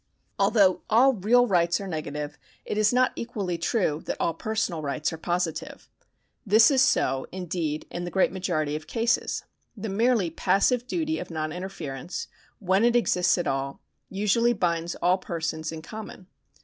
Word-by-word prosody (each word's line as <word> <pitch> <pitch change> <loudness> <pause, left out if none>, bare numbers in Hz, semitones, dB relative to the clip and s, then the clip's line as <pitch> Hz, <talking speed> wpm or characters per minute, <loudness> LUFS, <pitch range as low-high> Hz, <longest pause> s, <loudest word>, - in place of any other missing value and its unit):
Although 195 -5 +4
all 255 +5 +5
real 240 +4 +4
rights 175 -5 +2
are 200 - -6
negative, 150 -3 -5 0.3
it - - -3
is 210 0 +3
not 255 +1 +3
equally 200 -7 -3
true 170 -4 0
that - - -2
all 165 - +1
personal 195 -2 -2
rights 150 +2 -2
are - - -5
positive. 175 -1 -3 0.5
This 220 +5 +6
is 265 -2 +4
so, 135 - +2
indeed, 170 -4 -3
in 175 - -4
the 175 - -4
great 190 +1 +2
majority 170 -6 -1
of 155 0 -6
cases. 235 0 0 0.3
The 215 +1 -4
merely 215 -3 +2
passive 240 +9 +2
duty 320 +1 -1
of - - -7
non 155 -2 -3
interference, 175 -5 -6 0.3
when 190 +1 +1
it 240 0 +4
exists 180 -7 +3
at 175 - -1
all, 135 0 -2 0.3
usually 210 +4 +2
binds 170 -4 -1
all 180 +2 +2
persons 160 -3 -3
in 160 -1 -7
common. 215 0 -9
180 Hz, 160 wpm, -26 LUFS, 160-220 Hz, 0.5 s, This